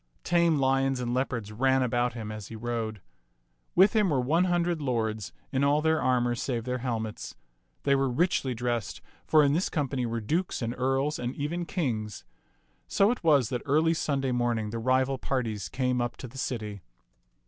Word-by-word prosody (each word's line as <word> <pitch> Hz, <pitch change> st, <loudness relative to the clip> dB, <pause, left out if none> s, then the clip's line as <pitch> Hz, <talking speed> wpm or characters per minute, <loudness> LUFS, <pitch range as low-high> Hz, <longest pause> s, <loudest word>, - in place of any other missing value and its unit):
Tame 170 Hz, -2 st, +3 dB
lions 135 Hz, -1 st, +2 dB
and 120 Hz, -1 st, -2 dB
leopards 125 Hz, -5 st, -2 dB
ran 130 Hz, +4 st, +2 dB
about 120 Hz, 0 st, 0 dB
him 110 Hz, -3 st, -6 dB
as 110 Hz, -2 st, -7 dB
he 115 Hz, -, -8 dB
rode. 110 Hz, -2 st, -3 dB, 0.7 s
With 195 Hz, +3 st, +6 dB
him 210 Hz, -3 st, +4 dB
were 140 Hz, -4 st, +2 dB
one 160 Hz, +8 st, +2 dB
hundred 175 Hz, -2 st, +1 dB
lords 110 Hz, -6 st, -1 dB, 0.2 s
in 135 Hz, -1 st, +1 dB
all 145 Hz, +1 st, +4 dB
their 160 Hz, 0 st, +2 dB
armor 120 Hz, -1 st, +2 dB
save 120 Hz, -1 st, -2 dB
their 125 Hz, +1 st, -2 dB
helmets. 115 Hz, -3 st, -4 dB, 0.5 s
They 140 Hz, -, +3 dB
were 135 Hz, -1 st, +2 dB
richly 130 Hz, -2 st, +1 dB
dressed, 120 Hz, -1 st, -2 dB, 0.3 s
for 155 Hz, -1 st, +6 dB
in 140 Hz, 0 st, +3 dB
this 175 Hz, +5 st, +1 dB
company 135 Hz, -5 st, -1 dB
were 115 Hz, 0 st, -2 dB
dukes 160 Hz, -, -1 dB
and 115 Hz, +1 st, -2 dB
earls 135 Hz, +4 st, 0 dB
and 125 Hz, +1 st, -3 dB
even 170 Hz, +4 st, -3 dB
kings. 110 Hz, -, -2 dB, 0.6 s
So 200 Hz, +3 st, +3 dB
it 245 Hz, -, -4 dB
was 145 Hz, -8 st, +4 dB
that 125 Hz, -2 st, -2 dB
early 155 Hz, +4 st, +3 dB
Sunday 135 Hz, -5 st, -1 dB
morning 120 Hz, -3 st, 0 dB
the 115 Hz, -, -3 dB
rival 130 Hz, +2 st, +1 dB
parties 115 Hz, -7 st, -2 dB
came 125 Hz, -1 st, 0 dB
up 120 Hz, 0 st, -3 dB
to 130 Hz, -, -7 dB
the 135 Hz, +3 st, -10 dB
city. 105 Hz, -6 st, -4 dB
130 Hz, 180 wpm, -28 LUFS, 120-145 Hz, 0.7 s, With